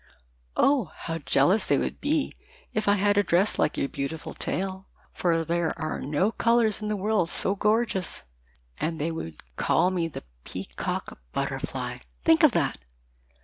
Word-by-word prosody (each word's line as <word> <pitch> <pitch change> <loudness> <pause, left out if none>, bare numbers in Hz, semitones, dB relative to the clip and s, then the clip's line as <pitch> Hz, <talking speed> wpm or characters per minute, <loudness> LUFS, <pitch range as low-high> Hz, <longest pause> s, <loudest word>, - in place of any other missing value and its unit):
"Oh, 275 -5 +4
how 165 0 -4
jealous 170 +8 +3
they 140 - +4
would - - -2
be 295 0 +1 0.4
if 215 -1 -1
I 205 - +6
had 205 +1 +3
a - - +4
dress 185 +3 +2
like - - +2
your - - +1
beautiful 140 +4 -4
tail, 190 +1 -3 0.3
for 165 -2 +1
there 170 0 0
are 155 0 -2
no 150 +9 +1
colors 230 -2 +2
in 210 - -3
the 210 - 0
world 205 -3 +1
so 195 - 0
gorgeous, 210 -2 0 0.6
and 165 +1 -1
they 155 +3 -1
would 80 - -6
call 180 - +3
me 175 -3 0
the 160 - -8 0.2
Peacock - - -4
Butterfly! - - -3 0.2
Think - - +5
of - - +7
that! - - +1
185 Hz, 160 wpm, -27 LUFS, 165-210 Hz, 0.6 s, of